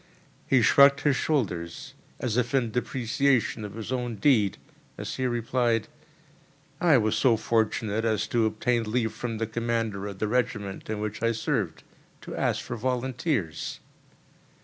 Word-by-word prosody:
He 130 -3 +4
shrugged 140 +4 +6
his 145 -3 +3
shoulders, 90 - -2 0.3
as 115 -4 -1
if 125 +1 +1
in 120 -4 +1
depreciation 125 -1 0
of 105 -1 -7
his 115 +1 -6
own 120 -2 -2
deed, 105 -3 +3 0.4
as - - -5
he 130 - 0
replied: 120 -1 0 0.9
"I 165 -6 +5
was 110 -1 +1
so 115 0 +4
fortunate 110 -1 0
as 110 -2 +1
to 115 -2 +2
obtain 115 +1 0
leave 115 -2 0
from 115 0 -4
the 115 - -1
commander 115 -3 -2
of 100 -2 -7
the 110 - -1
regiment 105 -5 -2
in 110 -1 -2
which 105 0 -4
I 115 0 +2
served, 110 0 -2 0.4
to - - -7
ask - - 0
for 120 - -4
volunteers." 125 - -2
115 Hz, 150 wpm, -27 LUFS, 110-125 Hz, 0.9 s, shrugged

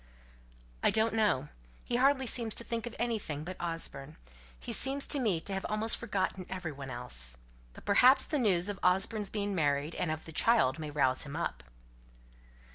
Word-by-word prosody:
"I - - +4
don't 220 +1 +2
know. 200 -11 +1 0.3
He 240 - -1
hardly 265 +1 +3
seems 230 -2 +1
to - - +4
think 230 0 -4
of 235 - -8
anything 210 -11 -3
but 185 +3 -6
Osborne. 160 -4 -4 0.4
He - - -7
appears 275 +1 +2
to 285 - +3
me 210 -10 +1
to 195 - -3
have 190 - -3
almost 215 +1 +3
forgotten 190 -4 -3
every 185 -4 -5
one 140 -1 -8
else. 65 - -1 0.4
But - - -14
perhaps 255 +6 +6
the 300 - -1
news 190 -6 +2
of 205 -1 -4
Osborne's 195 +3 +1
being 205 -1 -2
married, 145 -2 0
and 175 - -2
of 155 0 -4
the 160 - -9
child, 165 - +3
may 155 -1 -5
rouse 130 -3 +1
him 145 0 -7
up." 160 - -3
190 Hz, 185 wpm, -31 LUFS, 150-225 Hz, 0.4 s, perhaps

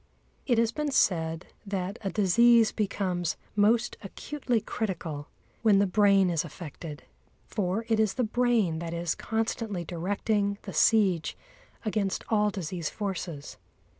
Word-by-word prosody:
It 240 -4 +3
has 230 0 +3
been 300 +3 -2
said 165 - +1 0.2
that 195 0 -3
a 195 - -2
disease 225 +3 +5
becomes 185 -5 -1 0.2
most 220 +3 +3
acutely 245 +4 -2
critical 170 -9 -4 0.3
when 215 -3 +5
the 200 - +4
brain 195 -1 +4
is 165 -3 0
affected. 155 -1 -8 0.4
For 205 +1 -2
it 225 -2 +2
is 215 -3 +2
the 250 - +1
brain 225 -7 +1
that 170 0 -4
is 170 -1 -1
constantly 220 -4 -2
directing 200 +4 -1
the - - -7
siege 195 -7 +3 0.5
against 210 -3 -1
all 210 -1 +3
disease 180 -4 -4
forces. 180 -7 -5
200 Hz, 135 wpm, -28 LUFS, 175-220 Hz, 0.5 s, disease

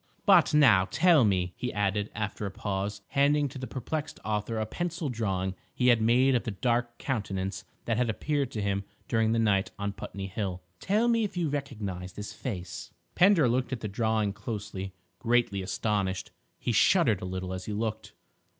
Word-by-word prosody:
"But 190 -6 +6
now, 120 -11 +6
tell 165 -5 +5
me," 90 -4 +1
he 125 - -3
added, 105 0 0
after 105 0 -3
a - - -3
pause, 100 +1 -3
handing 145 +1 +3
to 130 - -8
the 130 - -5
perplexed 150 +4 -4
author 110 +1 -1
a 110 - 0
pencil 170 - -3
drawing 95 -6 -1 0.2
he 125 0 +3
had 120 -2 +5
made 125 +4 +4
of 120 - +2
the - - -3
dark 120 +3 -1
countenance 100 -7 -3 0.2
that 115 -2 0
had 125 -1 +1
appeared 140 +4 -1
to 105 - -2
him 100 0 0 0.2
during 110 -2 +2
the 115 - +2
night 100 -4 +2
on 100 0 -2
Putney 100 -1 -6
Hill—"tell 95 - -2
me 230 -1 +3
if 200 -3 -3
you 170 -4 +1
recognise 105 -11 -4
this 105 -1 -7
face?" 90 -6 -6 0.2
Pender 180 -7 +5
looked 125 +3 0
at 120 - -4
the 110 - -2
drawing 110 -1 0
closely, 100 -3 -5 0.2
greatly 115 -5 +1
astonished. 95 -1 -1 0.3
He - - -2
shuddered 115 - +4
a - - -4
little 95 0 -4
as 95 0 -5
he - - -4
looked. 110 +1 -3
110 Hz, 180 wpm, -29 LUFS, 100-130 Hz, 0.3 s, But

